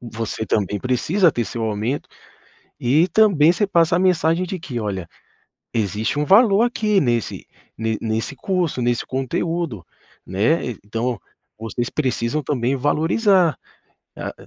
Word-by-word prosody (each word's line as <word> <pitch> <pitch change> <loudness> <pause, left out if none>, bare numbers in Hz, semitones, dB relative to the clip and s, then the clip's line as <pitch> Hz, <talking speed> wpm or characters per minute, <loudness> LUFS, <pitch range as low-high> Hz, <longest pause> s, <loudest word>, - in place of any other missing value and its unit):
você 115 -2 -5
também 105 -1 -1
precisa 155 - +2
ter 120 - -1
seu 115 - -5
aumento. 110 +5 -2 0.7
E 150 +9 +3
também 175 -5 +4
você 205 +3 0
passa 170 -3 +3
a - - +2
mensagem 180 -1 +2
de 185 +1 -5
que: 130 -7 -5
"Olha, 95 -5 -4 0.7
existe 110 +4 -1
um 150 - +1
valor 205 +3 +5
aqui 215 -4 +1
nesse 120 -4 -1 0.3
ne 110 0 -2
nesse 110 +4 -2
curso, 175 -6 -1
nesse 120 -1 0
conteúdo, 135 - -3 0.4
né? 110 - +1 0.2
Então, 115 +4 -3 0.4
vocês 115 +2 -3
precisam 135 0 -1
também 130 -1 -1
valorizar". 165 - +2 0.6
Ah, - - -5
135 Hz, 135 wpm, -21 LUFS, 115-175 Hz, 0.7 s, valor